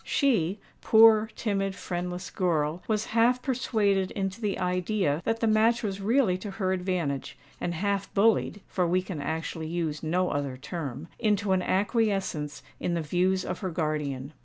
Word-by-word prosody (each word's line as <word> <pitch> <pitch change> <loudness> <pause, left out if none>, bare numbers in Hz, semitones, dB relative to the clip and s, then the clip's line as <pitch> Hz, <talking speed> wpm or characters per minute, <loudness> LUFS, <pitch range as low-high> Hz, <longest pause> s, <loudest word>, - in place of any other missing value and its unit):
She—poor 220 - +3
timid, 195 -3 -1
friendless 180 0 -4
girl!—was 175 +5 0
half 235 +2 +4
persuaded 210 -7 +1
into 195 +2 -3
the 205 -2 -1
idea 180 -3 0
that 225 0 0
the - - +2
match 225 +2 +3
was 195 -2 -3
really 210 -3 +2
to 205 - -6
her 190 -1 -1
advantage, 180 -7 -2 0.2
and 175 - -2
half 200 +2 -1
bullied 210 -1 +2
(for 180 -2 0
we 180 +2 +1
can 180 -5 -5
actually 160 +1 -3
use 160 -3 -2
no 180 +3 0
other 140 -2 -2
term) 145 0 -6
into 210 -3 +1
an 185 -1 +3
acquiescence 195 -7 0 0.2
in 175 - -1
the 165 - -1
views 185 +4 +1
of - - -4
her 190 - -3
guardian. 150 -4 -2
185 Hz, 155 wpm, -27 LUFS, 165-210 Hz, 0.2 s, half